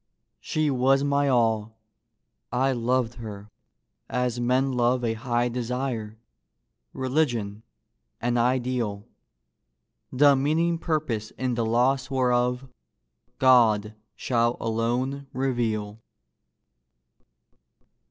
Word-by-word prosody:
She 155 -2 -1
was 135 +2 +3
my 140 0 +1
all. 110 -4 +1 0.7
I 130 +2 +1
loved 125 -1 0
her 105 -1 -9 0.6
as 125 -1 -1
men 130 +3 +1
love 125 0 +1
A 115 - 0
high 120 +1 -1
desire, 120 -2 -3 0.7
religion, 120 -7 -1 0.6
an 120 +1 -1
ideal 120 -4 0 1.0
The 140 +2 +5
meaning 160 +5 +1
purpose 150 -11 -2
in 130 -1 -1
the 115 -1 -1
loss 130 +4 +1
whereof 125 -1 +1 0.7
God 110 -5 +4 0.2
shall 120 -1 0
alone 120 +5 -2
reveal. 115 -5 -2
125 Hz, 90 wpm, -25 LUFS, 115-135 Hz, 1.0 s, The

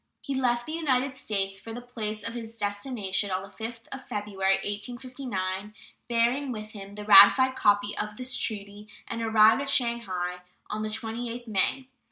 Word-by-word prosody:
He 275 - -5
left 240 -2 +1
the - - -6
United 275 -5 0
States 195 -5 -1
for 225 +4 -8
the 240 - -5
place 220 -4 -5
of 230 - -5
his 230 -1 -7
destination 205 -1 -2
on 185 0 -2
the 195 - -10
5th 230 +2 -7
of 270 - -8
February, 200 -3 0
1859, 210 -3 -4 0.3
bearing 240 +4 +1
with 215 -2 -6
him 200 -1 -10
the 210 0 -7
ratified 205 +6 +8
copy 205 -2 +2
of 210 0 -4
this 255 0 -1
treaty, 205 -1 -4 0.2
and 230 - -4
arrived 220 +2 +5
at 280 - -2
Shanghai 230 -9 0 0.3
on 210 +1 -2
the 215 - -2
28th 230 +2 -4
May. 230 +5 0
220 Hz, 170 wpm, -27 LUFS, 205-245 Hz, 0.3 s, ratified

